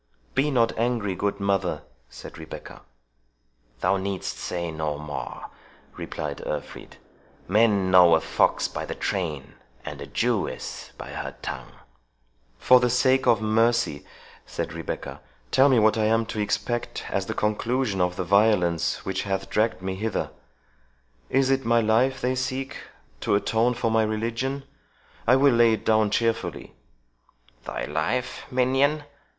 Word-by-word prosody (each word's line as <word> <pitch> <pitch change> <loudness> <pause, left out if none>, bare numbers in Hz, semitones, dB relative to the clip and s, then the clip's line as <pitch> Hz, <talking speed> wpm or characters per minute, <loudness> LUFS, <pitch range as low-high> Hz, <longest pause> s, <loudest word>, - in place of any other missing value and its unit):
"Be 145 +3 +2
not 115 -5 +2
angry, 115 -4 0
good 100 +2 -2
mother," 95 -6 0 0.3
said - - -11
Rebecca. 80 - -9 1.0
"Thou 100 - +2
needst 95 0 -3
say 85 -2 -3
no 80 -2 -3
more," 75 -3 -6 0.4
replied 75 -2 -5
Urfried - - -6 0.5
"men 100 -2 +3
know 90 -3 +7
a - - +3
fox - - +1
by - - -5
the - - -5
train, 80 -8 -3 0.3
and - - -7
a - - -6
Jewess - - -2
by - - -8
her - - -6
tongue." - - -6 0.8
"For 125 - +6
the 125 0 +2
sake 130 +2 +3
of 110 -2 +4
mercy," 115 -7 +2 0.4
said - - -4
Rebecca, - - -6 0.3
"tell 135 +2 +5
me 130 - +4
what 110 0 +4
I 110 - +2
am 115 +1 +2
to 110 - -4
expect 120 +3 -2
as - - -1
the - - -3
conclusion 110 -1 0
of 90 0 +1
the 95 - -2
violence 90 -3 +2
which 95 0 -1
hath 95 -1 -3
dragged 110 -3 +1
me 95 0 -2
hither! 105 +2 -2 1.0
Is 135 0 +2
it 135 0 +1
my 115 0 +3
life 120 +4 +2
they 125 +1 +1
seek, 130 +1 -3 0.4
to - - +1
atone 115 +4 +1
for 115 -1 0
my 110 0 +3
religion? 115 +5 -2 0.6
I 125 - +6
will 135 0 +5
lay 115 -1 +5
it 110 0 -4
down 110 -1 +3
cheerfully." 115 +2 -1 0.9
"Thy - - -4
life, 80 - -2
minion?" 135 +4 +2
110 Hz, 145 wpm, -25 LUFS, 95-125 Hz, 1.0 s, know